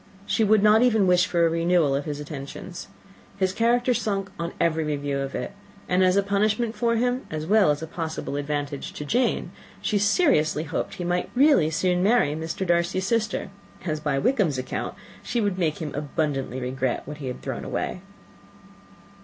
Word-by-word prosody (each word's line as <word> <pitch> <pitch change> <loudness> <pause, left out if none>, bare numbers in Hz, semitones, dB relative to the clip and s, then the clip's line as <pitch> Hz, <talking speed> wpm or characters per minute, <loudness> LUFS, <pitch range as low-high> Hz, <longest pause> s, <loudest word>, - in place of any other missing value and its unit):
She 220 - +1
would 215 -1 +4
not 215 +1 +6
even 220 -5 +4
wish 180 0 +4
for 170 -3 +2
any 165 0 +1
renewal 170 -4 +3
of 140 +1 -1
his 150 -1 -4
attentions. 150 +4 -7 0.5
His 190 -1 +1
character 240 +3 +2
sunk 200 -3 -2
on 170 0 -2
every 160 -1 +2
review 145 -2 -2
of 135 0 -4
it; 125 - -3 0.4
and, 180 +1 +3
as 185 +1 +4
a 200 - +4
punishment 210 +3 0
for 235 -1 +1
him, 245 +3 0
as 155 0 -4
well 205 0 +4
as 150 +1 0
a - - -2
possible 160 -3 -4
advantage 145 0 -3
to 150 - -6
Jane, 245 - 0 0.3
she 210 - 0
seriously 200 - +3
hoped 165 0 -3
he 180 - -5
might 175 +1 -1
really 275 - +5
soon 180 +3 +1
marry 200 -7 +3
Mr. 160 +4 -3
Darcy's 175 +2 +1
sister, 215 -2 -1 0.3
as, 155 -3 -1
by 150 -2 -1
Wickham's 175 - +1
account, 130 - -4 0.3
she 240 - -2
would 200 -4 0
make 160 -4 0
him 155 -4 -5
abundantly 145 -3 -2
regret 130 0 -2
what 150 +1 -7
he 140 -3 -6
had 125 - -6
thrown - - -4
away. 180 - -3
175 Hz, 185 wpm, -25 LUFS, 150-205 Hz, 0.5 s, not